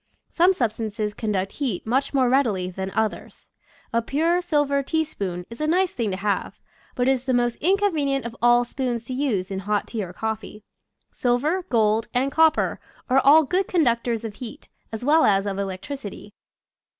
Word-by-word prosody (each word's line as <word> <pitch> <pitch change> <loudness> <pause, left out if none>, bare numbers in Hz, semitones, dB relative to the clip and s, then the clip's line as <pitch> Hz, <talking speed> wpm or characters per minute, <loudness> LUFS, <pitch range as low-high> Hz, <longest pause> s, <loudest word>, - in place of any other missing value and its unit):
Some 355 +2 +4
sub 245 - 0
stances 215 -1 -4
conduct 200 -3 -2
heat 255 -11 -3
much 265 +5 0
more 265 -3 +2
readily 220 -9 +1
than 190 +1 -4
others. 220 -1 -3 0.4
A 230 - +2
pure 325 +9 +1
silver 290 -5 +1
teaspoon 205 - -3
is 230 - -8
a 305 - 0
nice 365 +3 +2
thing 230 -4 -1
to 185 - -3
have, 200 +1 -2 0.4
but 245 0 0
it - - +5
is 260 -1 -1
the 260 -1 +1
most 240 -1 +1
inconvenient 315 - +1
of 235 0 -6
all 240 0 +5
spoons 240 -2 -3
to 255 - -5
use 225 -9 -1
in 190 - -2
hot 205 +1 -1
tea 220 -3 -3
or 180 - -7
coffee. 215 +1 -5 0.5
Silver, 295 +9 0
gold, 220 -1 +2
and 265 +3 +1
copper 320 0 +3 0.3
are 265 - +6
all 305 +4 +7
good 365 +6 0
conductors 235 - +1
of 220 - -5
heat, 240 -3 -9 0.2
as 225 +2 -5
well 315 +3 +5
as 195 -1 +3
of 200 -1 -3
electricity. 205 +2 -6
240 Hz, 180 wpm, -23 LUFS, 210-285 Hz, 0.5 s, all